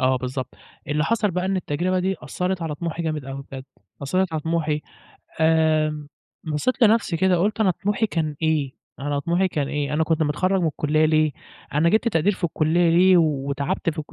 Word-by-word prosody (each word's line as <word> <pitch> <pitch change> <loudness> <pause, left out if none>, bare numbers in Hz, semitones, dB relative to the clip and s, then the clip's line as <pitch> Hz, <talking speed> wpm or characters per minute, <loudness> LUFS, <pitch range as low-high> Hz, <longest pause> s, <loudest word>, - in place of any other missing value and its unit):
آه، 130 0 +3
بالضبط. 130 0 -5 0.3
اللي 150 +1 +1
حصل 215 -2 +1
بقى 180 +1 -2
إن 190 0 0
التجربة 180 +2 -1
دي 190 +1 -1
أثّرت 180 -1 -2
على 155 -2 -3
طموحي 170 +1 -4
جامد 155 -4 -3
أوي 135 0 -6
بجد، 130 -1 -7 0.4
أثّرت 185 +5 0
على 160 - -1
طموحي، 155 -1 -1 0.6
آمم، 155 -2 +2 0.4
بصّيت 160 - -1
لنفسي 215 -6 +3
كده 185 +1 +3
قُلت 210 +5 0
أنا 195 - +4
طموحي 205 +4 -1
كان 160 -6 -2
إيه؟ 150 -4 +1 0.3
أنا 145 0 -1
طموحي 175 +5 +1
كان 145 -5 -2
إيه؟ 150 0 -2
أنا 160 +1 +2
كنت 160 0 +1
متخرج 185 +6 +1
من 170 - +1
الكلية 155 0 +1
ليه؟ 155 -1 +2 0.4
أنا 155 +3 +3
جِبت 220 +5 +2
تقدير 195 0 +2
في 185 - -6
الكلية 165 +1 +2
ليه 180 +2 +5
وتعبت 145 +2 0
في 155 - -10
الك 150 - -6
160 Hz, 190 wpm, -23 LUFS, 150-185 Hz, 0.6 s, ليه